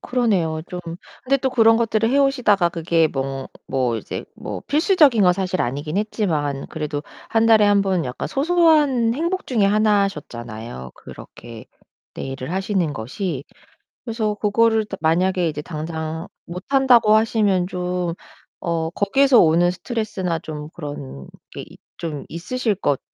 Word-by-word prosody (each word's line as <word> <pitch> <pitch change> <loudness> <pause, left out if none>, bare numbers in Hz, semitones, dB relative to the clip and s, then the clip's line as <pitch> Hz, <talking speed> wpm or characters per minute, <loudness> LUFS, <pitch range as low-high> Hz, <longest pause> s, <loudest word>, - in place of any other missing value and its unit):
그러네요, 185 -11 0
좀. 180 - -5 0.4
근데 275 +2 +3
또 265 0 -1
그런 225 -2 +5
것들을 225 -1 +1
해 280 - +3
오시다가 240 -10 +3
그게 165 -1 +1
뭐 135 -1 -4 0.2
뭐 125 -3 0
이제 110 - -6
뭐 - - -6
필수적인 300 - +4
건 180 -1 +5
사실 185 0 -2
아니긴 145 +7 -2
했지만 160 -10 -1
그래도 150 -2 -4 0.3
1 225 0 +2
달에 220 -2 +6
1 205 -1 +4
번 185 -5 0
약간 125 0 -5
소소한 295 -6 +3
행복 340 +7 -2
중에 230 -6 +2
하나 205 0 +3
셨잖아요, 120 - -8
그렇게 115 -2 -12 0.5
네일을 135 +3 -6
하시는 190 -5 0
것이. 140 - -4 0.6
그래서 220 -3 -2
그거를 220 +2 +2
다 195 - -7
만약에 175 +3 +1
이제 150 -2 -3
당장 160 +1 -5 0.2
못한다고 235 +4 +3
하시면 210 -5 +2
좀 180 -2 -2 0.5
어 165 -1 -2
거기에서 245 +8 +3
오는 170 +2 +4
스트레스나 190 -4 -3
좀 150 -1 -7
그런 140 - -8 0.2
게 - - -7
있 - - -13 0.2
좀 150 -4 -5
있으실 215 +7 -2
것 145 -8 0
185 Hz, 295 characters per minute, -21 LUFS, 155-225 Hz, 0.6 s, 달에